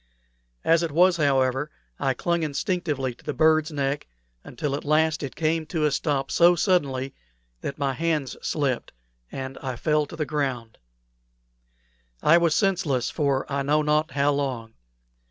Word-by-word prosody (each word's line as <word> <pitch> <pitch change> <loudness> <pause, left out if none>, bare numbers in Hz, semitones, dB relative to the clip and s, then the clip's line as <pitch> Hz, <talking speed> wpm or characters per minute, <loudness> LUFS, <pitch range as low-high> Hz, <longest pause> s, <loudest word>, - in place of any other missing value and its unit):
As 165 0 +4
it 165 -2 -2
was, 175 +3 +4
however, 135 -1 +1 0.3
I 135 -1 0
clung 170 +5 0
instinctively 150 -4 -2
to 120 - -22
the 150 - -4
bird's 155 0 +3
neck, 140 -1 -2 0.4
until 150 -3 -4
at 145 - -5
last 155 +1 +2
it 140 -3 -5
came 160 0 0
to 155 -2 -1
a 150 - +2
stop 135 -2 -1
so 175 +1 +5
suddenly 140 -8 0 0.5
that - - -5
my 140 -2 0
hands 155 -3 -1
slipped, 140 -5 -2 0.4
and 135 0 -6
I 130 -2 -4
fell 150 +3 +1
to - - -9
the 155 - -2
ground. 130 -7 -3 1.4
I 165 +3 +6
was 170 -2 +2
senseless 165 - +1
for 140 -4 0
I 140 0 -1
know 150 +2 +2
not 150 +1 +1
how 140 +1 +2
long. 130 -6 -3
150 Hz, 155 wpm, -25 LUFS, 135-160 Hz, 1.4 s, I